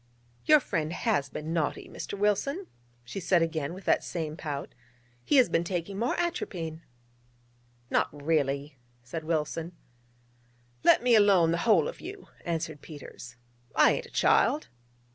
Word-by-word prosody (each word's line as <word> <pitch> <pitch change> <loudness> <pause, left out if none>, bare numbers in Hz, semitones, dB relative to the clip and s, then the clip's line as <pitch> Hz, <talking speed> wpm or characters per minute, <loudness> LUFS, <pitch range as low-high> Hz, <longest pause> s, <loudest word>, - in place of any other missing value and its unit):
'Your 305 0 +7
friend 165 - -2
has 175 - 0
been 155 +4 -5
naughty, 160 -3 -1
Mr. 200 - -6
Wilson,' 240 - 0 0.4
she 120 +11 -6
said 175 -2 +3
again 160 -3 -2
with 185 +2 -9
that - - +3
same 160 -3 -4
pout: 145 -4 -5 0.5
'he - - +1
has 260 -3 +7
been 165 0 +1
taking 180 +2 -3
more 240 +2 0
atropine.' 175 - -3 1.1
'Not - - +2
really?' 145 -1 -1 0.3
said 155 +7 -6
Wilson. 160 +1 -2 1.1
'Let - - +5
me 245 -1 +4
alone, 200 -6 +5
the 170 - 0
whole 170 -9 +5
of - - -7
you,' 390 +2 -9 0.2
answered 160 -3 -3
Peters: 135 -5 -10 0.4
'I - - +6
ain't - - -2
a - - -18
child.' 305 -8 +2
165 Hz, 145 wpm, -28 LUFS, 155-205 Hz, 1.1 s, Your